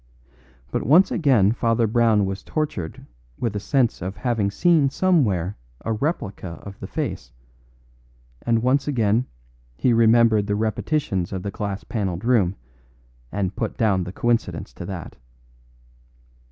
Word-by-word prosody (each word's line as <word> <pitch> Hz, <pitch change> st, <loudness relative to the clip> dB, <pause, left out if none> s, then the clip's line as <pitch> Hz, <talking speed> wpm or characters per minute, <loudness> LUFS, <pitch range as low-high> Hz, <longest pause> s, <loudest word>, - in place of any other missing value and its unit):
But -, -, -1 dB
once 165 Hz, -, +5 dB
again 125 Hz, -, +3 dB
Father 115 Hz, 0 st, +1 dB
Brown 110 Hz, -2 st, +3 dB
was 95 Hz, 0 st, -4 dB
tortured 125 Hz, -, -4 dB, 0.3 s
with 115 Hz, -4 st, -2 dB
a -, -, -1 dB
sense 120 Hz, +4 st, +1 dB
of 95 Hz, +2 st, -5 dB
having 115 Hz, -5 st, 0 dB
seen 155 Hz, -, +3 dB
somewhere 110 Hz, -, +1 dB, 0.2 s
a 115 Hz, -, -2 dB
replica 105 Hz, -, -3 dB
of 100 Hz, -1 st, -10 dB
the -, -, -6 dB
face; -, -, -4 dB, 1.1 s
and 115 Hz, -1 st, +1 dB
once 135 Hz, +3 st, +2 dB
again 115 Hz, -3 st, +1 dB, 0.5 s
he 125 Hz, -, +2 dB
remembered 115 Hz, -2 st, +4 dB
the 105 Hz, -, 0 dB
repetitions 110 Hz, -, -1 dB
of 95 Hz, -2 st, -4 dB
the 100 Hz, -, -3 dB
glass 100 Hz, 0 st, -4 dB
panelled 95 Hz, -3 st, -3 dB
room, 105 Hz, -7 st, +3 dB, 0.8 s
and 100 Hz, -1 st, -2 dB
put -, -, -3 dB
down 100 Hz, -5 st, +2 dB
the 90 Hz, -, -6 dB
coincidence 120 Hz, +3 st, -1 dB
to 85 Hz, -, -8 dB
that. 95 Hz, -4 st, -7 dB
110 Hz, 140 wpm, -23 LUFS, 100-125 Hz, 1.1 s, once